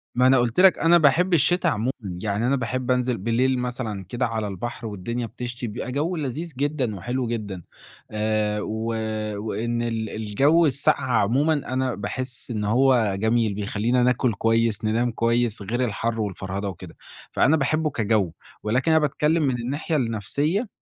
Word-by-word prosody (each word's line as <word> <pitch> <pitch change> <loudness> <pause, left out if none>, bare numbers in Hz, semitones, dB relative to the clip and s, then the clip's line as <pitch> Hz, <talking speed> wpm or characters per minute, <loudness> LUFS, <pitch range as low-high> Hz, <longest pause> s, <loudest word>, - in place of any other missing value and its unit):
ما 125 +1 +4
أنا 130 0 +6
قُلت 120 +4 +1
لك 190 -1 +6
أنا 170 +1 +6
باحب 170 +4 +3
الشِّتا 170 +3 +3
عمومًا، 120 -2 0
يعني 100 +4 -2
أنا 135 - +3
باحب 125 0 -2
أنزِل 125 -1 +1
بالليل 125 +5 +1
مثلًا 120 -6 -4
كده 125 +1 -1
على 110 -2 -2
البحر 115 +4 -5
والدنيا 115 +4 -4
بتشْتي، 120 +1 -6
بيبقى 115 +3 -5
جَوّ 155 +7 -1
لذيذ 155 +2 -4
جدًا 140 -6 -1
وحلو 120 +7 -2
جدًا 105 -6 -4 0.5
آآ، 105 -1 0
و 110 +2 -3 0.5
وإن 115 +2 -2
ال 115 -2 -2
الجوّ 135 +11 +2
الساقعة 130 -2 +1
عمومًا 140 +9 +2
أنا 130 -3 -1
باحس 125 +4 -6
إن 105 -2 -2
هو 120 -3 +3
جميل، 110 0 +2
بيخلّينا 110 +5 0
ناكُل 125 -1 +2
كويس، 115 0 +1
ننام 115 +3 +1
كويس، 115 -1 0
غِير 120 +6 -1
الحَر 115 0 -2
والفرهدة 100 0 -3
وكده، 90 -3 -10 0.4
فأنا 155 +4 +3
باحبه 155 +3 +1
كجَوّ 110 - 0 0.3
ولكن 125 +9 +1
أنا 160 - +5
باتكلّم 150 +2 +1
من 135 -3 +1
الناحية 145 +6 -2
النَفْسية 140 - -1
120 Hz, 160 wpm, -24 LUFS, 110-135 Hz, 0.5 s, أنا